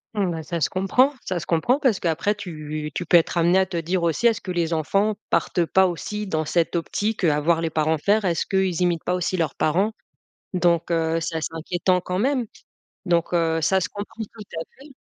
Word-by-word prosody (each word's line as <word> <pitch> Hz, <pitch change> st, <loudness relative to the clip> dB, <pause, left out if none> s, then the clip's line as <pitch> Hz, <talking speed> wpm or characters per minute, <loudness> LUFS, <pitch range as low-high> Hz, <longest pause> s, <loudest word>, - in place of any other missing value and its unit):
Mmh, 195 Hz, -4 st, +1 dB
ben 160 Hz, -1 st, -4 dB
ça 170 Hz, 0 st, -4 dB
se -, -, +2 dB
comprend. 195 Hz, +9 st, +3 dB
Ça 185 Hz, -2 st, -2 dB
se 165 Hz, -, -7 dB
comprend, 235 Hz, -, +2 dB
parce 255 Hz, -9 st, +2 dB
qu'après 170 Hz, +5 st, 0 dB
tu 155 Hz, -6 st, -6 dB
tu 180 Hz, -, -3 dB
peux 175 Hz, -, +6 dB
être 170 Hz, +1 st, +1 dB
amenée 170 Hz, +2 st, +4 dB
à 190 Hz, -, +4 dB
te 180 Hz, -2 st, -5 dB
dire 170 Hz, +2 st, -1 dB
aussi: 170 Hz, +8 st, +2 dB
«Est-ce 225 Hz, -1 st, +1 dB
que 185 Hz, -, -5 dB
les 170 Hz, -2 st, -1 dB
enfants 195 Hz, +7 st, +1 dB, 0.2 s
partent 175 Hz, -2 st, +1 dB
pas 190 Hz, +3 st, +4 dB
aussi 210 Hz, +4 st, -4 dB
dans 155 Hz, -4 st, -1 dB
cette 170 Hz, +3 st, 0 dB
optique, 205 Hz, +5 st, -2 dB
heu, 155 Hz, -, +4 dB
à 145 Hz, -, +1 dB
voir 165 Hz, +2 st, +2 dB
les 165 Hz, -, -1 dB
parents 160 Hz, +1 st, +1 dB
faire? 205 Hz, +7 st, +2 dB
Est-ce 170 Hz, -4 st, 0 dB
qu'ils 190 Hz, -3 st, 0 dB
imitent 170 Hz, -2 st, 0 dB
pas 180 Hz, -, 0 dB
aussi 180 Hz, +1 st, -1 dB
leurs 165 Hz, -2 st, -1 dB
parents?» 185 Hz, +8 st, +1 dB, 0.6 s
Donc, 175 Hz, -2 st, +1 dB
heu, 165 Hz, -1 st, +1 dB
c'est 165 Hz, 0 st, -3 dB
assez 160 Hz, 0 st, -3 dB
inquiétant 180 Hz, +3 st, 0 dB
quand 180 Hz, +1 st, -3 dB
même 255 Hz, +1 st, +1 dB, 0.6 s
donc, 170 Hz, -1 st, +1 dB
heu, 165 Hz, -1 st, +2 dB
ça 190 Hz, +4 st, +2 dB
se -, -, -2 dB
comprend 210 Hz, +2 st, -6 dB
tout 215 Hz, 0 st, -11 dB
à 165 Hz, -, -2 dB, 0.2 s
fait. 280 Hz, 0 st, -14 dB
175 Hz, 225 wpm, -23 LUFS, 165-195 Hz, 0.6 s, peux